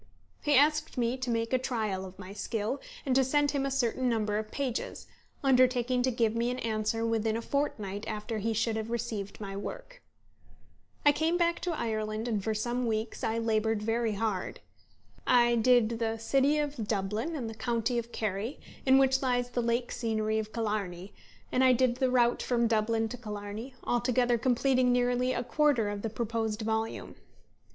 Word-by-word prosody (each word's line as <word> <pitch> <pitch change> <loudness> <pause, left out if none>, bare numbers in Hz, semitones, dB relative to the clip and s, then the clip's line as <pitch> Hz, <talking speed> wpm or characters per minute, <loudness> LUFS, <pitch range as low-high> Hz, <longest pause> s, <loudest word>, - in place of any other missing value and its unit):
He 295 -1 +2
asked 305 +2 +3
me 240 0 +1
to 255 -1 -4
make 230 +1 -1
a 255 - +4
trial 215 -7 -2
of 185 0 -11
my 190 0 -9
skill, 220 +4 -3 0.2
and 265 - +1
to 265 - +5
send 290 +2 +2
him 275 -1 0
a - - -1
certain 260 -1 0
number 215 -2 0
of 215 0 -6
pages, 260 -2 -3 0.4
undertaking 255 -1 +3
to 255 - +2
give 230 -3 +1
me 235 +1 +1
an 250 - -2
answer 225 -1 -1
within 225 -1 0
a - - -3
fortnight 210 -8 -2
after 215 +1 -3
he 225 +2 -1
should 225 +1 0
have 220 0 -4
received 225 -4 -4
my 195 -2 -6
work. - - -7 1.0
I 290 - +8
came 320 +4 +1
back 340 -1 +1
to 340 -2 -2
Ireland, 215 0 -2
and 215 -4 -1
for 220 +1 -1
some 240 +3 -1
weeks 220 0 -2
I 225 +1 0
laboured 220 -1 0
very 225 0 0
hard. 200 -3 -2 0.7
I 240 -1 +5
"did" 230 -1 +3
the 225 -1 -1
city 275 +6 +2
of 290 -7 -2
Dublin, 210 +10 -1
and 250 -6 -3
the 225 - -5
county 235 +1 -1
of 235 0 -7
Kerry, 215 +4 -3 0.3
in 265 0 +7
which 265 0 +4
lies 245 -2 0
the 245 - 0
lake 235 +1 0
scenery 220 -2 0
of 215 0 -5
Killarney; 205 -5 -3 0.4
and 255 - +3
I 260 -1 +6
"did" 250 0 +2
the 260 -1 +2
route 240 -1 +3
from 240 -1 +1
Dublin 225 0 +1
to 250 - -6
Killarney, 210 +2 -7
altogether 245 0 +1
completing 255 +1 +3
nearly 245 +1 +2
a 240 - -1
quarter 275 -5 +2
of 205 0 -4
the 225 - -2
proposed 225 -1 -2
volume. 220 0 -2
230 Hz, 185 wpm, -30 LUFS, 220-255 Hz, 1.0 s, I